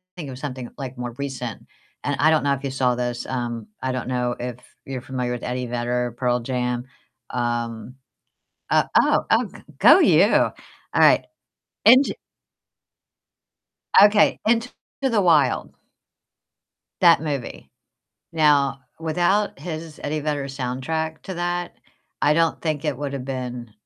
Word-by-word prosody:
think 160 -6 -7
of 130 -1 -8
something, 130 -4 -6
like, 130 -2 -7
more 120 -1 -5
recent, 130 -5 -5 0.4
and 145 - 0
I 155 - +5
don't 155 - +2
know 140 -1 +2
if 140 - -5
you 140 - -2
saw 125 -2 +1
this. 120 0 -3
Um, 120 -3 -4 0.2
I 130 - 0
don't 130 -1 -4
know 125 -1 -1
if 125 -1 -5 0.3
you're 135 -2 -5
familiar 125 -1 -3
with 120 - -6
Eddie 125 0 -3
Vedder, 120 0 -2
Pearl 125 -1 +1
Jam. 125 0 -2 0.5
Um 120 0 -3 0.7
uh, - - +4 0.2
oh, - - +2
oh, - - +4
g - - -13 0.2
go - - +8
you. - - +6
All - - +3 0.5
right, - - +5 0.6
Into 255 +5 +7 1.9
Okay. 205 0 +5
Into 230 +2 +2 0.3
the 240 -6 +2
Wild 155 -8 +2 1.3
that - - +6
movie. 145 -5 -5 0.6
Now, 145 -4 +3 0.2
without 175 +6 +1
his 160 -2 -7
Eddie 155 +1 -2
Vedder 145 -1 -2
soundtrack 135 +4 -3
to 190 - -6
that, 175 0 -3 0.5
I 150 - +3
don't 165 0 +1
think 155 -2 -2
it 150 -4 -1
would've 140 -2 -4
been, 125 -3 -5
135 Hz, 140 wpm, -23 LUFS, 125-155 Hz, 1.9 s, go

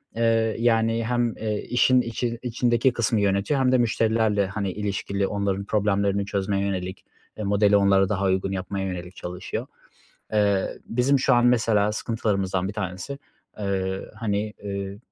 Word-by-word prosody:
eee, 115 -1 +2
yani, 115 -1 +2
hem, 120 -1 0
eee, 110 -1 -2
işin 125 +1 +4
içi 120 0 -3
içindeki 120 0 +1
kısmı 110 -2 +1
yönetiyor 100 +8 +1
hem 130 -1 +3
de 130 - +5
müşterilerle, 110 -3 +2
hani, 100 0 -3
ilişkili, 100 -1 -2
onların 100 -1 -1
problemlerini 100 -1 +1
çözmeye 100 0 -1
yönelik, 95 -1 -4 0.3
eee, 105 - -4
modeli 100 0 +4
onlara 100 -1 +4
daha 100 -2 0
uygun 95 0 +1
yapmaya 95 +1 -3
yönelik 90 0 -6
çalışıyor. 90 +1 -5 0.7
Eee, 100 -2 +1
bizim 130 +4 +2
şu 130 0 +3
an 120 0 +4
mesela 110 -4 +3
sıkıntılarımızdan 100 -4 -1
1 100 - -5
tanesi, 100 +6 -5 0.4
eee, 95 -1 -2
hani, 105 -1 -2
eee, 100 -1 -4
105 Hz, 145 wpm, -24 LUFS, 100-115 Hz, 0.7 s, de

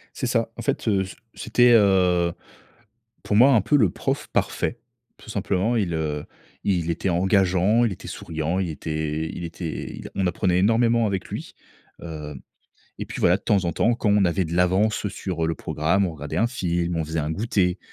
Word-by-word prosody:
C'est - - -2
ça. - - +1
En - - -6
fait, - - -2
heu, 100 -3 +2
c 95 - -10 0.2
c'était, 120 +1 +3
heu, 90 -5 +4 0.9
pour 105 - -1
moi, 130 +5 +7
un 115 - +5
peu, 145 - +1
le 110 -10 +4
prof - - -3
parfait, 120 - -1 0.4
tout - - -15
simplement. 100 +2 0
Il, 100 -7 0
heu, 75 -2 -2 0.4
il 90 -4 0
était 85 +3 -1
engageant, 95 +4 +3
il 115 - +1
était 95 - -8
souriant, 80 +2 -3
il 95 -3 -1
était 80 0 -3
i - - -6
il - - -6
était 85 -1 -5
il - - -8
a - - -13
on 95 - 0
apprenait 90 0 +1
énormément 115 +3 +3
avec 100 -3 -2
lui. - - -7 0.5
Heu, 75 -3 -7 0.7
et - - -5
puis, - - -7
voilà, 90 - +4
de 100 - -16
temps 100 -4 +2
en 85 - 0
temps, 120 +9 +2
quand 115 -3 0
on 100 -1 +4
avait 90 +2 +1
de 80 +1 -4
l'avance, 95 +5 +2
heu, - - 0
sur, 90 -4 -3
heu, - - +1
le 80 - 0
programme, 85 +7 0
on 90 - -2
regardait 75 -2 -6
un 115 - +3
film, 85 -7 -1
on 80 - -1
faisait 80 +1 -4
un 75 - -2
goûter, 95 0 0
90 Hz, 210 wpm, -24 LUFS, 85-105 Hz, 0.9 s, moi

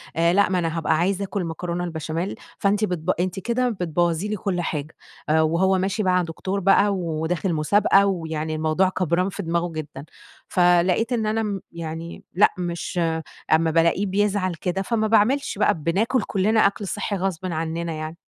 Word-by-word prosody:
آآ 170 +1 +3
لأ 200 +2 +4
ما 185 -2 +1
أنا 165 -1 -2
هابقى 155 -1 +1
عايزة 190 +4 0
أكل 195 0 -3
مكرونة 170 +2 -3
البشاميل، 165 +2 -3 0.2
فأنتِ 205 +1 +2
بتب 180 -3 -4
أنتِ 185 +1 -1
كده 240 +5 0
بتبوظي 175 -2 0
لي 210 - -2
كل 185 -3 -2
حاجة، 150 -2 -4 0.3
آآ 160 +1 +4
وهو 175 +4 +2
ماشي 195 +3 -1
مع 180 -1 +3
دكتور 185 +4 -3
بقى 195 +2 +4
وداخل 170 +1 -2
مسابقة، 195 +5 +4
ويعني 160 -4 -2
الموضوع 155 +4 +2
كبران 180 0 0
في 200 +1 -6
دماغه 170 +1 -1
جدًا، 150 -3 -7 0.4
فلقيت 180 +6 +3
إن 225 -2 0
أنا 215 +1 0
ام 205 -3 -3
يعني 165 0 -7
لأ 200 +4 +5
مش 175 0 -3 0.5
أما 160 0 +3
بالاقيه 170 +4 +2
بيزعل 195 -1 0
كده 180 +3 -2
فما 220 +2 0
باعملش 235 +7 +2
بقى - - +3
بناكل 200 - 0
كلنا 210 +2 +2
أكل 200 0 -4
صحّي 185 +4 -2
غصبٍ 190 -2 -2
عننا 165 -1 -3
يعني. 155 +1 -6
180 Hz, 170 wpm, -23 LUFS, 165-200 Hz, 0.5 s, لأ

